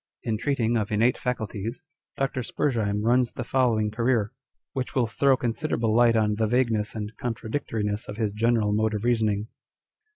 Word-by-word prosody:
In 110 -2 -1
treating 120 -4 +1
of 105 -1 -2
innate 115 +4 +3
faculties, 115 - -4 0.3
Dr. 135 -1 -1
Spurzheim 110 -5 -1
runs 120 +1 +2
the 125 - -4
following 115 -4 +1
career, 115 -1 +1 0.4
which 130 -1 -4
will 125 -3 +3
throw 135 +4 +2
considerable 115 -2 -1
light 120 -1 +5
on 105 -1 +2
the 110 0 +1
vagueness 115 -3 +1
and 105 -1 -4
contradictoriness 110 -3 -3
of 105 - -6
his 110 -3 0
general 110 -1 +1
mode 110 +1 +1
of 105 - -3
reasoning. 110 -3 +1
115 Hz, 160 wpm, -26 LUFS, 105-125 Hz, 0.4 s, light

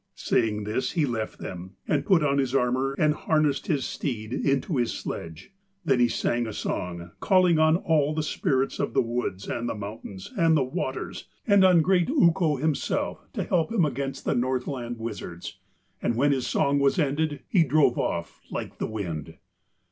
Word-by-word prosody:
Saying 105 -2 0
this 105 +5 -2
he 160 -4 +2
left 115 -4 -3
them 90 +1 -8
and - - 0
put 185 -7 +4
on 140 -1 +2
his 135 -1 0
armour 130 +2 +1
and 150 -1 +3
harnessed 155 +1 0
his 145 -8 0
steed 115 -4 -4
into 140 +4 0
his 120 -2 +1
sledge. 80 - -7 0.3
Then 135 -5 +3
he 120 - +5
sang 120 0 -1
a 110 - -5
song, 85 -3 -4
calling 180 -4 +4
on 155 0 +5
all 155 -4 +2
the 155 - 0
spirits 135 -4 0
of - - -2
the - - +5
woods 115 -5 -3
and 120 0 -2
the - - -3
mountains 100 -2 -8
and 165 -1 +4
the 140 - +2
waters 130 +1 -4 0.2
and 200 -2 +5
on 180 -3 +6
great 180 +2 +2
Ukko 170 - +3
himself 150 +2 -2
to - - -2
help 175 +4 0
him 200 -8 +3
against 135 -1 -4
the - - +1
Northland 125 -1 -2
wizards, 105 -6 -7 0.4
and 120 - 0
when 140 +4 +3
his 130 -3 0
song 140 0 +2
was 140 +5 +2
ended 150 -1 0
he 180 -5 +4
drove 145 -3 +3
off 85 0 -3
like - - -6
the - - -1
wind. 85 -8 -5
135 Hz, 180 wpm, -26 LUFS, 115-155 Hz, 0.4 s, on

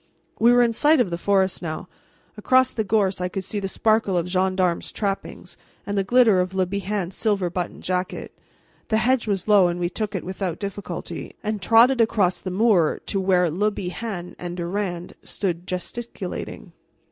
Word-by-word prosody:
We 235 +2 +6
were 245 0 +6
in 235 -1 +1
sight 300 +6 +4
of 205 -8 +1
the - - 0
forest 190 0 +1
now; 170 +1 -5 0.5
across 255 +4 +3
the 220 - -2
gorse 200 -3 +1
I 180 - 0
could 190 +1 -4
see 205 +2 -4
the 195 - -3
sparkle 215 -1 +1
of 170 - 0
gendarmes' 185 -1 0
trappings, 200 -2 -4 0.3
and 205 - -3
the 195 - +1
glitter 225 -2 +4
of 180 +1 -1
Le 190 -1 +2
Bihan's 195 -1 -3
silver 200 -5 0
buttoned 180 0 -4
jacket. 185 0 -3 0.5
The 220 - +1
hedge 245 +1 +1
was 200 -2 -1
low 205 -4 +6
and 175 0 -2
we 175 0 0
took 210 +2 -4
it 185 - -3
without 185 -2 -3
difficulty, 200 0 -6
and 215 -2 -2
trotted 235 +5 +5
across 200 -5 +2
the 185 - -4
moor 185 -4 +2
to 195 - -1
where 180 -3 +2
Le 205 +6 +1
Bihan 185 -1 -5
and 175 0 -5
Durand 175 0 -3
stood 180 -2 -3
gesticulating. 230 +6 -6
195 Hz, 180 wpm, -23 LUFS, 180-215 Hz, 0.5 s, We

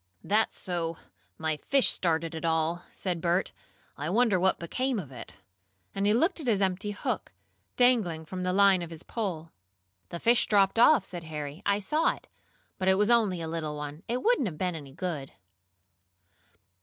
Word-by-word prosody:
"That's 215 +2 +1
so 170 -2 -3 0.4
my 160 -1 -1
fish 275 - +2
started 165 -1 0
it 160 - -6
all!" 165 +1 0
said 180 -3 -3
Bert. 175 +2 0 0.4
"I 150 +3 -4
wonder 215 -1 +3
what 190 +1 +2
became 255 +9 -2
of 155 -10 -6
it?" 130 - -10 0.6
and 195 +1 0
he 210 - +4
looked 335 +9 +2
at 295 - -6
his 215 -4 +3
empty 195 +1 0
hook, 205 - -3 0.5
dangling 215 -11 +3
from 185 +3 -6
the 180 0 0
line 195 -1 +5
of 170 - -5
his 165 -1 -9
pole. 175 -8 -4 0.6
"The 170 - -5
fish 235 +4 +4
dropped 200 +1 +3
off," 240 -3 +6
said 175 -2 -7
Harry. 150 0 -6
"I 200 0 +3
saw 300 +11 +1
it. - - -18 0.5
But 185 - -1
it 190 - +5
was 210 +4 +2
only 210 -7 +3
a - - -4
little 160 -2 -3
one. 150 +1 -6
It 245 +2 -2
wouldn't 450 - +3
have 160 -5 -6
been 180 0 -1
any 145 -4 -8
good." 155 -3 -5
185 Hz, 180 wpm, -28 LUFS, 160-210 Hz, 0.6 s, off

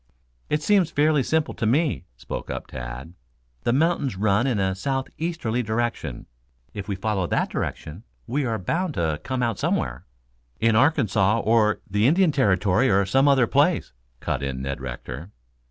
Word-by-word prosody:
"It 150 0 0
seems 195 -5 +3
fairly 150 -1 +3
simple 160 +4 0
to 110 - -2
me," 140 - +1
spoke - - -6
up - - -4
Tad. 65 +5 -8 0.5
"The - - +3
mountains 145 - +1
run 100 +5 +2
in 120 -6 0
a 95 -1 +1
southeasterly 135 - -2
direction. 120 +1 -3 0.5
If 100 -1 -6
we 100 - -2
follow 95 -2 -1
that - - 0
direction 80 +6 -4 0.2
we 140 +5 -1
are 115 -3 -1
bound 165 - -2
to 80 -2 -1
come 130 -2 -2
out 115 -4 -1
somewhere 60 0 -1 0.3
" - - -41
"In 115 0 +3
Arkansas 115 -6 +3
or 110 -1 +2
the 105 +4 +2
Indian 175 +3 +4
Territory 105 -2 +2
or 100 0 +3
some 135 +8 +3
other 135 -3 +5
place," 145 - +1 0.3
cut 65 - -2
in 65 -1 -3
Ned 70 -1 -4
Rector. 65 +5 -7
110 Hz, 165 wpm, -24 LUFS, 95-140 Hz, 0.5 s, other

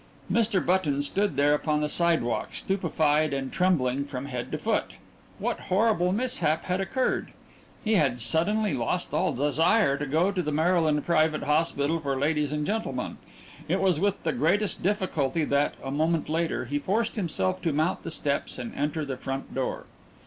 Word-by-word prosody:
Mr. 220 -5 +2
Button 155 -6 +1
stood 195 +2 0
there 145 +1 +4
upon 150 0 0
the 150 - +1
sidewalk, 165 -7 0
stupefied 155 -5 +1
and 135 -1 -3
trembling 140 -8 +1
from 135 -2 -6
head 125 -4 -5
to - - -1
foot. - - -1 0.4
What - - -2
horrible 185 -2 +2
mishap 215 -8 0
had 185 +1 -1
occurred? 255 +7 -1 0.5
He 220 - +1
had 135 -7 +2
suddenly 175 - +1
lost 120 -4 -2
all - - +1
desire 150 - +2
to 145 - -3
go 160 +7 +2
into 195 -2 -1
the 150 -3 -2
Maryland 160 -1 +2
Private 155 -2 +2
Hospital 150 +1 +1
for 140 -3 -2
Ladies 150 +1 0
and 150 0 -1
Gentlemen 220 +5 -3 0.5
it - - +1
was 185 -5 +2
with 200 +2 0
the 160 - 0
greatest 190 - +1
difficulty 170 -7 0
that, 140 0 +1
a 135 - -4
moment 160 +3 0
later, 160 -4 -1
he 145 +4 -2
forced 210 +9 -1
himself 185 -1 -1
to 165 - 0
mount 155 +5 0
the - - -6
steps 145 -3 -2
and 120 -2 -6
enter 150 +2 -2
the 135 -2 -4
front 135 +1 -5
door. 130 -1 -3
155 Hz, 170 wpm, -27 LUFS, 145-185 Hz, 0.5 s, there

